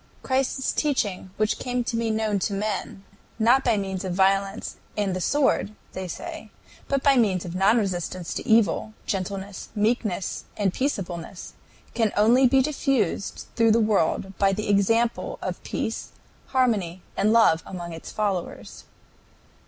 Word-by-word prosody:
"Christ's 265 0 0
teaching, 210 -11 -1
which 215 0 +1
came 250 -1 -1
to 235 - -3
be 230 0 0
known 215 -2 0
to 200 - -1
men, 200 -1 -3 0.3
not 240 +4 +4
by 235 -4 +2
means 190 -1 -3
of 185 -2 -3
violence 195 +1 +1 0.2
and 200 -3 0
the 185 - -3
sword," 260 -5 +1 0.2
they 185 0 -4
say, - - -7 0.4
"but 275 -1 0
by 275 -2 +5
means 195 -7 +2
of 170 - -6
non 195 +5 +4
resistance 185 -4 -2
to - - -5
evil, 220 -1 +3
gentleness, 195 +1 -4
meekness, 210 -3 -1
and 195 -3 +1
peaceableness, 185 - -4 0.4
can 225 -3 +1
only 240 +5 +5
be 265 +1 +4
diffused 270 - -1
through 225 -2 +4
the 230 - +4
world 195 -2 +1
by 195 -1 +4
the 210 +2 -3
example 225 +4 +2
of - - -4
peace, - - -4 0.3
harmony, 205 -9 0
and 205 +2 +2
love 220 -8 +5
among 175 -2 -7
its 165 - -8
followers." 200 -5 -3
210 Hz, 150 wpm, -25 LUFS, 190-230 Hz, 0.4 s, by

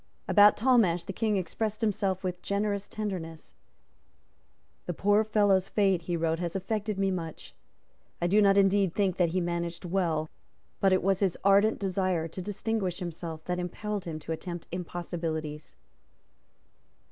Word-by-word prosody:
About 205 0 +6
Talmash 215 -9 +3
the 195 - -6
King 215 0 0
expressed 210 +4 -3
himself 195 -3 0
with 180 -1 -3
generous 200 0 -1
tenderness. 180 -7 -6 1.3
"The 175 - -3
poor 205 +4 +3
fellow's 205 -3 +2
fate," 195 -4 +2
he 170 0 -2
wrote, 165 0 0
"has 175 0 -3
affected 210 +2 -2
me 195 -1 +1
much. 165 -4 -6 0.7
I 175 - 0
do 200 +5 +4
not 200 -1 +5
indeed 195 -2 +3
think 190 -3 +1
that 175 -2 +3
he 185 +3 0
managed 170 0 -3
well; 170 -4 0 0.5
but 195 - +3
it 185 - +3
was 195 0 +2
his 195 -4 +1
ardent 200 +3 +4
desire 185 -4 -1
to 165 +3 -7
distinguish 200 -1 -2
himself 165 -2 -6
that 180 0 -2
impelled 200 +3 -4
him 165 -2 -4
to 160 - -7
attempt 170 +1 -5
impossibilities." 165 -3 -5
185 Hz, 150 wpm, -29 LUFS, 170-200 Hz, 1.3 s, About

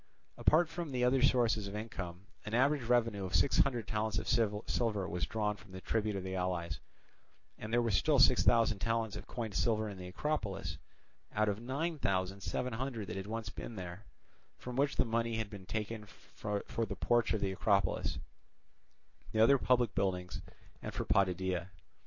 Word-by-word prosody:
Apart 165 +2 +4
from 160 -4 -5
other 125 +1 +4
sources 120 -6 +3
of 100 - -6
income, 95 -4 -6 0.2
an 110 - -3
average 140 +3 +3
revenue 115 -4 +2
of 95 -1 -2
six 90 +11 +4
hundred 120 -6 +2
talents 110 -2 -1
of - - -2
silver 105 -2 +1
was 85 +1 -2
drawn 105 -1 0
from 100 -2 -16
the 95 - -7
tribute 110 -1 0
of 95 - -3
the 95 0 -4
allies; 90 -3 -2 0.8
and 110 - -6
there 120 +1 +3
were 115 - +1
still 145 +9 +3
six 130 -1 +6
thousand 115 -3 +4
talents 115 0 0
of - - -8
coined 115 -4 -4
silver 110 +1 +1
in 100 -3 -7
the 90 - -7
Acropolis, 105 0 -2 0.6
out 110 +1 +3
of 105 +1 -1
nine 145 +6 -2
thousand 95 -2 0
seven 125 +5 -2
hundred 120 -2 -3
that - - -4
had 95 0 -5
once 110 -1 -4
been 115 - -7
there, 90 +1 -7 0.5
from 125 0 -7
which 140 +2 +2
the 125 - +2
money 115 0 0
had 110 -2 -3
been 95 -3 -9
taken 105 +1 -4
for 105 -1 -5 0.2
the - - -4
porch 120 -1 +2
of 110 - +1
the 95 - +1
Acropolis, 100 +1 +1 1.2
the 110 - +1
other 135 +5 +6
public 125 -4 +2
buildings, 90 -2 -1 0.4
and - - -6
for - - -2
Potidæa. 95 -1 +1
110 Hz, 180 wpm, -34 LUFS, 95-120 Hz, 1.2 s, six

